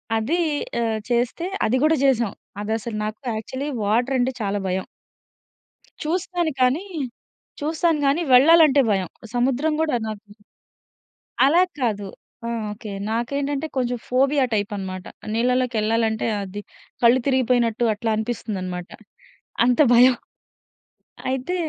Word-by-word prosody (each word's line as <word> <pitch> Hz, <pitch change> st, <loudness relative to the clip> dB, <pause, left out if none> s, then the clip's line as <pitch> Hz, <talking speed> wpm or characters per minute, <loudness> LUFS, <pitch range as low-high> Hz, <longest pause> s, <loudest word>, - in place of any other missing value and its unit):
అది. 230 Hz, +11 st, 0 dB, 0.4 s
ఆహ్, 220 Hz, -1 st, 0 dB
చేస్తే 245 Hz, +8 st, 0 dB, 0.2 s
అది 225 Hz, -, +1 dB
గూడా 315 Hz, +1 st, +4 dB
చేసాం. 240 Hz, -6 st, +2 dB, 0.3 s
అదసలు 220 Hz, +1 st, -3 dB
నాకు 215 Hz, 0 st, -5 dB, 0.2 s
యాక్చువల్లీ 260 Hz, +7 st, -4 dB
వాటర్ 240 Hz, +6 st, +1 dB
అంటే 250 Hz, +2 st, +1 dB
చాలా 205 Hz, -1 st, -1 dB
భయం. 185 Hz, +1 st, -2 dB, 1.2 s
చూస్తాను 350 Hz, 0 st, -1 dB
కానీ, 265 Hz, +10 st, +2 dB, 0.8 s
చూస్తాను 320 Hz, +1 st, +1 dB
గానీ 295 Hz, +5 st, +2 dB
వెళ్లాలంటే 290 Hz, +1 st, +7 dB
భయం. 190 Hz, -4 st, 0 dB, 0.3 s
సముద్రం 265 Hz, +5 st, +1 dB
కూడా 310 Hz, -5 st, +1 dB
నాకు 215 Hz, -1 st, -6 dB, 1.2 s
అలా 335 Hz, +6 st, +5 dB, 0.2 s
కాదు. 205 Hz, -5 st, -1 dB, 0.4 s
ఆ! -, -, -2 dB, 0.2 s
ఓకే. 210 Hz, 0 st, -9 dB, 0.2 s
నాకేంటంటే 280 Hz, +6 st, -1 dB
కొంచెం 245 Hz, -1 st, 0 dB
ఫోబియా 270 Hz, +2 st, +3 dB
టైప్ 205 Hz, 0 st, 0 dB
అన్నమాట. 185 Hz, -1 st, -6 dB, 0.3 s
నీళ్లలోకెళ్లాలంటే 230 Hz, -2 st, +1 dB
అది 200 Hz, +1 st, -6 dB, 0.4 s
కళ్ళు 240 Hz, +2 st, +6 dB
తిరిగిపోయినట్టు 245 Hz, -3 st, +2 dB
అట్లా 220 Hz, +2 st, -3 dB
అనిపిస్తుందన్నమాట. 195 Hz, -6 st, -4 dB, 0.8 s
అంత 250 Hz, +1 st, +2 dB
భయం. 250 Hz, +1 st, +7 dB, 1.1 s
అయితే 265 Hz, +7 st, -2 dB
245 Hz, 110 wpm, -23 LUFS, 215-275 Hz, 1.2 s, వెళ్లాలంటే